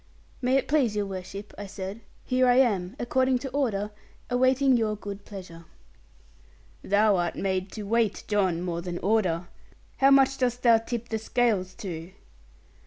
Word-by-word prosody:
'May 255 Hz, +1 st, +3 dB
it -, -, -1 dB
please 265 Hz, -8 st, +2 dB
your 205 Hz, -1 st, 0 dB
worship,' 195 Hz, +1 st, -7 dB
I 205 Hz, -, -6 dB
said, 195 Hz, +3 st, -7 dB, 0.2 s
'here 255 Hz, 0 st, +2 dB
I 245 Hz, -, +5 dB
am 210 Hz, -6 st, +2 dB
according 260 Hz, +1 st, +1 dB
to 270 Hz, +2 st, -5 dB
order, 215 Hz, -7 st, -1 dB, 0.4 s
awaiting 260 Hz, +1 st, +3 dB
your 220 Hz, -2 st, +1 dB
good 200 Hz, -1 st, -8 dB
pleasure.' 180 Hz, -5 st, -10 dB, 1.2 s
'Thou 205 Hz, 0 st, +3 dB
art 175 Hz, -1 st, -1 dB
made 190 Hz, -1 st, -2 dB
to 215 Hz, -, -6 dB
weight, 220 Hz, 0 st, 0 dB
John, 190 Hz, -5 st, +1 dB
more 170 Hz, -2 st, -3 dB
than 175 Hz, 0 st, -5 dB
order. 185 Hz, -4 st, +1 dB, 0.5 s
How 270 Hz, -, +5 dB
much 270 Hz, -1 st, +5 dB
dost 245 Hz, -1 st, 0 dB
thou 230 Hz, -2 st, +6 dB
tip 235 Hz, +1 st, -5 dB
the 220 Hz, -, -1 dB
scales 215 Hz, -5 st, 0 dB
to?' 175 Hz, -2 st, -7 dB
210 Hz, 160 wpm, -27 LUFS, 190-245 Hz, 1.2 s, thou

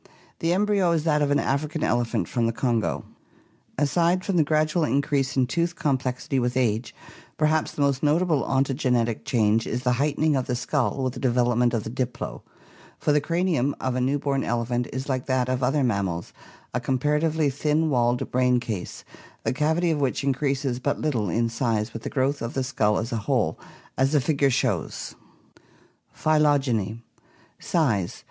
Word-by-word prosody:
The 165 Hz, -, 0 dB
embryo 195 Hz, -2 st, +2 dB
is 160 Hz, -2 st, 0 dB
that 150 Hz, -2 st, +2 dB
of 145 Hz, -, +2 dB
an 145 Hz, -, +3 dB
African 150 Hz, +3 st, -1 dB
elephant 120 Hz, 0 st, 0 dB
from 120 Hz, -2 st, 0 dB
the -, -, +1 dB
Kongo. 115 Hz, -1 st, -1 dB, 0.7 s
Aside 170 Hz, +6 st, +2 dB
from 195 Hz, -, -1 dB
the 165 Hz, -, +5 dB
gradual 155 Hz, +2 st, +1 dB
increase 140 Hz, 0 st, 0 dB
in 130 Hz, -, +4 dB
tooth 170 Hz, +6 st, -1 dB
complexity 130 Hz, -1 st, -1 dB
with 125 Hz, +1 st, -1 dB
age, 115 Hz, -2 st, 0 dB, 0.4 s
perhaps 155 Hz, 0 st, +1 dB
the 145 Hz, -, 0 dB
most 140 Hz, -2 st, +1 dB
notable 155 Hz, 0 st, +2 dB
ontogenetic 130 Hz, -4 st, 0 dB
change 110 Hz, -2 st, +2 dB
is 125 Hz, +2 st, -3 dB
the 125 Hz, -, +2 dB
heightening 150 Hz, +1 st, +1 dB
of 130 Hz, -2 st, -1 dB
the 125 Hz, -, -1 dB
skull 125 Hz, +2 st, -1 dB
with 130 Hz, -1 st, -1 dB
the -, -, -7 dB
development 120 Hz, -1 st, +2 dB
of 110 Hz, -, -1 dB
the 110 Hz, -, -6 dB
diploe, 125 Hz, 0 st, -4 dB, 0.6 s
for -, -, 0 dB
the 145 Hz, 0 st, +3 dB
cranium 165 Hz, -4 st, 0 dB
of 130 Hz, -, -1 dB
a 125 Hz, -, -1 dB
new 135 Hz, +3 st, +1 dB
born 140 Hz, -1 st, -1 dB
elephant 120 Hz, +1 st, -1 dB
is 130 Hz, +2 st, -4 dB
like 130 Hz, -2 st, -2 dB
that 130 Hz, -2 st, +1 dB
of 130 Hz, 0 st, -1 dB
other 135 Hz, +3 st, +2 dB
mammals, 100 Hz, -7 st, -1 dB, 0.4 s
a 125 Hz, -, 0 dB
comparatively 150 Hz, +3 st, +1 dB
thin 150 Hz, +3 st, 0 dB
walled 120 Hz, -1 st, +1 dB
brain 125 Hz, 0 st, +3 dB
case, 110 Hz, -7 st, -5 dB, 0.4 s
the -, -, 0 dB
cavity 160 Hz, +5 st, +1 dB
of 150 Hz, -2 st, -1 dB
which 135 Hz, 0 st, 0 dB
increases 135 Hz, -2 st, 0 dB
but 140 Hz, +2 st, -1 dB
little 115 Hz, -10 st, -1 dB
in 115 Hz, +6 st, +1 dB
size 115 Hz, -1 st, -1 dB
with 115 Hz, -, -6 dB
the -, -, -5 dB
growth 140 Hz, +1 st, 0 dB
of 115 Hz, +1 st, -4 dB
the 135 Hz, -, 0 dB
skull 110 Hz, -5 st, +1 dB
as 115 Hz, -, -3 dB
a 115 Hz, -, -1 dB
whole, -, -, +1 dB, 0.4 s
as 135 Hz, +2 st, +2 dB
the 150 Hz, -, +5 dB
figure 140 Hz, 0 st, +2 dB
shows 125 Hz, -, -1 dB, 1.0 s
(Fig. -, -, -19 dB, 0.2 s
194). 140 Hz, -7 st, +3 dB
Phytogeny 115 Hz, +2 st, -9 dB, 0.6 s
Size. 115 Hz, -, 0 dB
130 Hz, 180 wpm, -25 LUFS, 120-150 Hz, 1.0 s, the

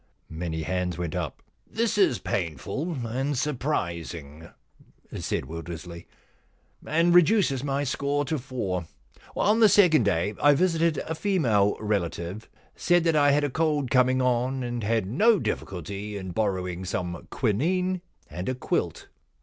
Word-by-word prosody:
Many 80 Hz, 0 st, -4 dB
hands 90 Hz, 0 st, -2 dB
went 85 Hz, -3 st, -3 dB
up. -, -, -4 dB
* -, -, -43 dB
This 230 Hz, -1 st, +2 dB
is 190 Hz, -, +3 dB
painful 110 Hz, -, -3 dB
and 130 Hz, +5 st, -2 dB
surprising,' 85 Hz, -, -3 dB, 0.7 s
said -, -, -2 dB
Wil 85 Hz, +1 st, -6 dB
dersley, 85 Hz, +1 st, -8 dB, 0.4 s
* -, -, -28 dB
and 170 Hz, +1 st, +4 dB
reduces 175 Hz, -, +4 dB
my 140 Hz, 0 st, -1 dB
score 140 Hz, +2 st, -1 dB
to 155 Hz, +1 st, -2 dB
four. 100 Hz, -10 st, -3 dB, 0.5 s
On 215 Hz, +2 st, +3 dB
the 220 Hz, -2 st, +7 dB
second 180 Hz, -7 st, +5 dB
day 100 Hz, +1 st, +1 dB
I 145 Hz, 0 st, +6 dB
visited 165 Hz, -1 st, +2 dB
a 160 Hz, -, -3 dB
female 135 Hz, -, +2 dB
relative, 100 Hz, -1 st, -3 dB, 0.3 s
said 175 Hz, -1 st, +2 dB
that 165 Hz, -2 st, +2 dB
I 145 Hz, -1 st, +5 dB
had 145 Hz, +1 st, +3 dB
a 145 Hz, -, -1 dB
cold 150 Hz, -4 st, 0 dB
coming 130 Hz, 0 st, +3 dB
on, 125 Hz, +1 st, 0 dB
and 120 Hz, -1 st, -3 dB
had 110 Hz, -1 st, +1 dB
no 210 Hz, -, +4 dB
difficulty 100 Hz, -, -4 dB
in 95 Hz, -2 st, -6 dB
borrowing 95 Hz, -3 st, -2 dB
some 90 Hz, -2 st, -4 dB
quinine 180 Hz, -, 0 dB, 0.3 s
and 90 Hz, +5 st, -5 dB
a 130 Hz, -, -1 dB
quilt.' 130 Hz, -, -2 dB
125 Hz, 150 wpm, -26 LUFS, 90-155 Hz, 0.7 s, the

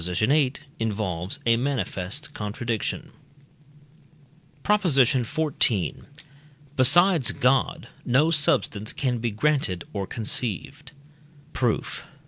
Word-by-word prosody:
viii) 125 Hz, -, +1 dB, 0.3 s
involves 100 Hz, -5 st, -1 dB
a 115 Hz, 0 st, +4 dB
manifest 135 Hz, +1 st, -3 dB
contradiction. 115 Hz, +7 st, -4 dB, 1.5 s
PROP. 210 Hz, 0 st, +2 dB
XIV. 130 Hz, -, +1 dB, 0.7 s
Besides 165 Hz, +3 st, +5 dB
God 130 Hz, +1 st, +1 dB, 0.2 s
no 140 Hz, +7 st, +2 dB
substance 115 Hz, -8 st, +1 dB
can 125 Hz, -5 st, -1 dB
be 120 Hz, +1 st, -1 dB
granted 110 Hz, -, 0 dB
or 100 Hz, -2 st, -3 dB
conceived. 125 Hz, +5 st, -3 dB, 0.6 s
Proof. 120 Hz, -3 st, -1 dB
125 Hz, 85 wpm, -25 LUFS, 105-145 Hz, 1.5 s, Besides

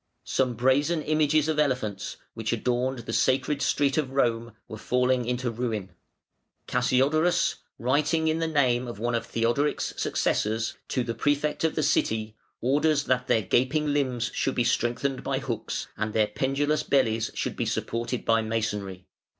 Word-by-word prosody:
Some 125 Hz, -2 st, 0 dB
brazen 145 Hz, +7 st, +2 dB
images 155 Hz, 0 st, +2 dB
of 155 Hz, -1 st, 0 dB
elephants 125 Hz, -9 st, -1 dB, 0.2 s
which 110 Hz, -1 st, -3 dB
adorned 125 Hz, +1 st, -1 dB
the 115 Hz, -, -4 dB
Sacred 135 Hz, +4 st, +1 dB
Street 140 Hz, +2 st, +2 dB
of 140 Hz, -4 st, -1 dB
Rome 115 Hz, -3 st, 0 dB
were 110 Hz, -, -8 dB
falling 125 Hz, +1 st, +1 dB
into 125 Hz, 0 st, -1 dB
ruin, 110 Hz, -5 st, -3 dB, 0.8 s
Cassiodorus, 145 Hz, +8 st, +2 dB, 0.2 s
writing 150 Hz, +6 st, +1 dB
in 160 Hz, +1 st, +1 dB
the 165 Hz, -, 0 dB
name 130 Hz, -5 st, +2 dB
of 120 Hz, -, -6 dB
one 120 Hz, +3 st, -1 dB
of 115 Hz, -, -1 dB
Theodoric's 120 Hz, +6 st, 0 dB
successors, 110 Hz, +1 st, 0 dB
to 130 Hz, -, -1 dB
the 115 Hz, -, -3 dB
Prefect 145 Hz, +5 st, 0 dB
of 160 Hz, -, +1 dB
the 155 Hz, -, 0 dB
City, 110 Hz, -6 st, 0 dB, 0.3 s
orders 145 Hz, +4 st, +2 dB
that 125 Hz, -1 st, 0 dB
their 110 Hz, -, +2 dB
gaping 145 Hz, +6 st, +1 dB
limbs 130 Hz, -5 st, 0 dB
should 135 Hz, -, -1 dB
be 120 Hz, -, +2 dB
strengthened 125 Hz, +2 st, 0 dB
by 135 Hz, -1 st, -1 dB
hooks, 120 Hz, -5 st, -3 dB
and 110 Hz, 0 st, -3 dB
their 110 Hz, -1 st, +3 dB
pendulous 135 Hz, +7 st, 0 dB
bellies 115 Hz, -6 st, +1 dB
should -, -, -2 dB
be -, -, -2 dB
supported 120 Hz, +1 st, -2 dB
by 115 Hz, 0 st, +3 dB
masonry. 105 Hz, -4 st, -3 dB
125 Hz, 160 wpm, -26 LUFS, 115-145 Hz, 0.8 s, their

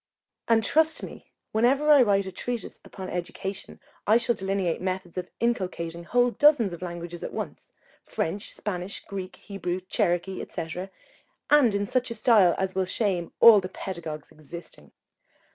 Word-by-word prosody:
and 225 Hz, -1 st, +4 dB
trust 315 Hz, +6 st, +2 dB
me, -, -, -10 dB, 0.2 s
whenever 270 Hz, +7 st, +3 dB
I 290 Hz, -3 st, +8 dB
write 200 Hz, -4 st, +3 dB
a 190 Hz, -, -5 dB
treatise 240 Hz, +4 st, -5 dB
upon 190 Hz, -2 st, -8 dB
education, 185 Hz, +2 st, -5 dB, 0.3 s
I 215 Hz, +2 st, +6 dB
shall 235 Hz, 0 st, +1 dB
delineate 195 Hz, -4 st, -1 dB
methods 185 Hz, -1 st, -3 dB
of 180 Hz, -, -4 dB
inculcating 180 Hz, -7 st, -2 dB
whole 245 Hz, +5 st, +3 dB
dozens 260 Hz, -, +4 dB
of 170 Hz, -, -8 dB
languages 175 Hz, -1 st, -6 dB
at -, -, -5 dB
once, -, -, -6 dB, 0.3 s
French, 200 Hz, +6 st, -3 dB
Spanish, 185 Hz, -1 st, -5 dB
Greek, 190 Hz, -2 st, -6 dB
Hebrew, 185 Hz, -3 st, -4 dB
Cherokee, 180 Hz, +1 st, -1 dB
&c., 170 Hz, +3 st, -5 dB, 0.6 s
in 230 Hz, -9 st, +5 dB
such 250 Hz, +4 st, 0 dB
a 230 Hz, -, -5 dB
style 215 Hz, -6 st, +5 dB
as 190 Hz, 0 st, -1 dB
will 190 Hz, 0 st, 0 dB
shame 185 Hz, -3 st, -1 dB
all 230 Hz, -3 st, +9 dB
the 185 Hz, -, -5 dB
pedagogues 165 Hz, -6 st, -6 dB
existing. 155 Hz, +3 st, -12 dB
190 Hz, 150 wpm, -26 LUFS, 175-230 Hz, 0.6 s, all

